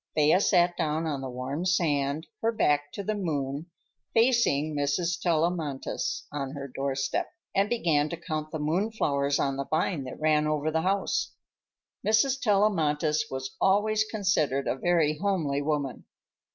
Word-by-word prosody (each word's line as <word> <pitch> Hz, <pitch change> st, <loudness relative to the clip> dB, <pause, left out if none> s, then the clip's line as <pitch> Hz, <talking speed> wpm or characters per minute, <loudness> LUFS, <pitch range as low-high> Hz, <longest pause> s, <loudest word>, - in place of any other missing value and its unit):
Thea 155 Hz, +5 st, +4 dB
sat 175 Hz, -3 st, +3 dB
down 160 Hz, 0 st, 0 dB
on 145 Hz, -4 st, -2 dB
the 135 Hz, -, -5 dB
warm 130 Hz, +6 st, -4 dB
sand, 155 Hz, -4 st, +1 dB, 0.2 s
her 225 Hz, -, +2 dB
back 145 Hz, -9 st, +1 dB
to 200 Hz, -, -5 dB
the 215 Hz, -, -1 dB
moon, 150 Hz, -6 st, -3 dB, 0.5 s
facing 225 Hz, -, +3 dB
Mrs. 165 Hz, +4 st, 0 dB
Tellamantez 165 Hz, -4 st, -1 dB
on 140 Hz, -2 st, -4 dB
her 140 Hz, -1 st, -6 dB
doorstep, 135 Hz, +1 st, -2 dB, 0.3 s
and 200 Hz, +1 st, +2 dB
began 160 Hz, -10 st, +1 dB
to 170 Hz, -, -4 dB
count 155 Hz, -2 st, -4 dB
the 160 Hz, -, -4 dB
moon 170 Hz, +9 st, 0 dB
flowers 140 Hz, -8 st, 0 dB
on 135 Hz, -1 st, 0 dB
the 140 Hz, -, -2 dB
vine 155 Hz, -2 st, 0 dB
that 130 Hz, -, -8 dB
ran 155 Hz, -1 st, +2 dB
over 155 Hz, 0 st, 0 dB
the 160 Hz, +1 st, +1 dB
house. 195 Hz, +3 st, 0 dB, 0.7 s
Mrs. 250 Hz, +5 st, +2 dB
Tellamantez 160 Hz, -8 st, +2 dB
was 130 Hz, 0 st, -5 dB
always 210 Hz, +2 st, +3 dB
considered 185 Hz, -11 st, 0 dB
a -, -, +1 dB
very 155 Hz, 0 st, +1 dB
homely 165 Hz, -9 st, 0 dB
woman. 145 Hz, -3 st, -2 dB
155 Hz, 150 wpm, -27 LUFS, 145-185 Hz, 0.7 s, Thea